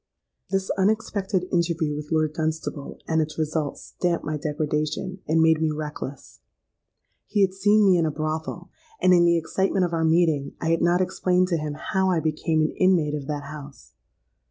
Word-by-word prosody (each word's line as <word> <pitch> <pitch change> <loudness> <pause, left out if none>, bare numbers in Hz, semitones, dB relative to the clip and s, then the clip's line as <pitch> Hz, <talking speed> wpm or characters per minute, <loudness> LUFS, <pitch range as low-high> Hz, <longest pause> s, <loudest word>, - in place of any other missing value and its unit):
"This 195 -1 -1
unexpected 200 -2 0
interview 165 -3 0
with 150 +1 -7
Lord 155 -1 +1
Dunstable 155 -2 -3
and 160 0 +2
its 155 0 -4
result 155 -2 -2
stamped 175 -1 -2
my 155 0 -2
degradation, 150 +5 -2
and 160 +1 +3
made 160 -1 +4
me 160 - +2
reckless. 150 -3 -6 0.9
He 205 - +1
had 190 -1 +3
seen 205 +2 +3
me 185 -3 +5
in 165 - +2
a - - -1
brothel; 155 +1 -4 0.3
and 185 - +5
in 175 -1 +5
the 170 0 +4
excitement 190 +3 0
of 175 - -4
our 165 -1 0
meeting, 160 -3 +2
I 165 - 0
had 165 - +1
not 175 +1 +3
explained 180 0 +1
to 170 - +1
him 150 -1 -3
how 190 +4 0
I 175 -3 +2
became 155 0 0
an 155 - +1
inmate 180 -6 +3
of 145 -2 -4
that 145 -1 -3
house. 145 -1 -11
160 Hz, 180 wpm, -24 LUFS, 155-180 Hz, 0.9 s, me